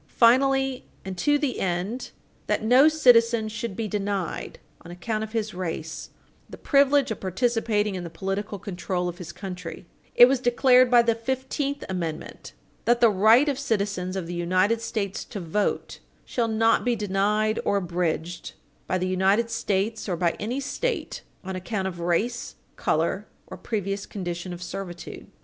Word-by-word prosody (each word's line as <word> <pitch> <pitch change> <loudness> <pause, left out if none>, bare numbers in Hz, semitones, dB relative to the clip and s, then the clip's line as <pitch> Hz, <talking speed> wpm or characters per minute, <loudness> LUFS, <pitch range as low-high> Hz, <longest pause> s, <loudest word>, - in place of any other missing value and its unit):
Finally, 265 - +3 0.2
and 190 -1 -5
to 290 +11 +2
the 285 -4 -2
end 190 +7 -2 0.4
that - - 0
no 250 +6 +6
citizen 235 -7 +4
should 215 -1 -5
be 225 +1 -2
denied, 200 -3 -3 0.3
on 170 - -11
account 215 +5 -3
of 220 0 -7
his 220 -2 -2
race, 165 -3 -5 0.4
the - - -9
privilege 280 -2 +3
of 220 - -4
participating 210 +1 0
in 185 -2 -4
the 170 - -6
political 195 +4 -4
control 180 -1 -3
of 175 0 -6
his 170 -2 -7
country, 180 -2 -7 0.3
it 240 - +10
as 265 0 +1
declared 250 +1 +4
by 240 -1 +6
the 230 -1 +3
Fifteenth 265 +4 -3
Amendment 170 -4 -5 0.3
that 240 0 +3
"the 235 -2 +6
right 220 +8 +5
of 280 -2 0
citizens 200 -7 -1
of 190 -3 -3
the 175 - -6
United 185 +6 +1
States 205 -4 -3
to 210 - -7
vote 185 +4 -2 0.3
shall 235 -2 -1
not 225 +1 +3
be 245 -1 +1
denied 210 +1 +1
or 200 - +1
abridged 175 -2 -2 0.3
by 185 - +1
the 185 - -1
United 195 +5 +2
States 220 -1 -1
or 180 - 0
by 170 0 +2
any 240 +6 -2
State 470 - -3 0.2
on 190 0 -5
account 190 +1 -3
of 175 -2 -6
race, 175 +8 -1 0.2
color - - 0 0.2
or - - -9
previous 200 -2 -3
condition 175 -2 -5
of 175 0 -7
servitude." 175 -1 -7
210 Hz, 165 wpm, -25 LUFS, 185-235 Hz, 0.4 s, it